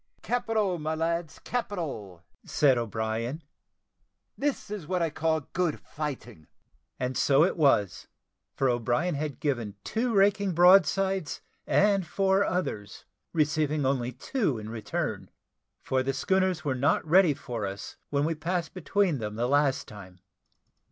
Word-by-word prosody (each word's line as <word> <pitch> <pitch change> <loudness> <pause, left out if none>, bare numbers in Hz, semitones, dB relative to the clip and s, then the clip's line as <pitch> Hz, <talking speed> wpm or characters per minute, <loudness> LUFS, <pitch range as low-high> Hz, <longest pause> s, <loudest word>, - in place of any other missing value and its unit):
"Capital, 215 -7 0
my 155 +1 -2
lads 165 0 -2
capital!" 145 - -4 0.2
said 140 -4 +3
O'Brien; 115 - -3 0.9
"this 280 -7 -2
is 200 -8 -5
what 185 +1 0
I 165 -2 0
call 160 0 0
good 175 -4 0
fighting." 125 - -7 0.5
And 125 0 -2
so 140 +2 +4
it 180 - +1
was; 135 - +2 0.5
for 135 - +1
O'Brien 120 +8 +1
had 145 -2 -4
given 120 -8 -2
two 235 +2 -1
raking 200 -1 +3
broadsides, 190 -2 +4 0.3
and 200 -3 +3
four 195 +2 +2
others, 145 - -3 0.3
receiving 150 -2 +1
only 130 -2 0
two 145 - -1
in 110 0 -7
return, 110 -3 -3 0.5
for 130 0 +1
the 135 +1 -1
schooners 185 +5 0
were 140 - +1
not 140 +6 +1
ready 170 -2 +5
for 115 -7 -4
us 95 0 -7
when 145 0 +1
we 165 - 0
passed 170 +2 -3
between 185 -2 0
them 105 -1 -4
the 120 +2 0
last 145 0 +2
time. 95 -4 -12
150 Hz, 140 wpm, -28 LUFS, 125-185 Hz, 0.9 s, ready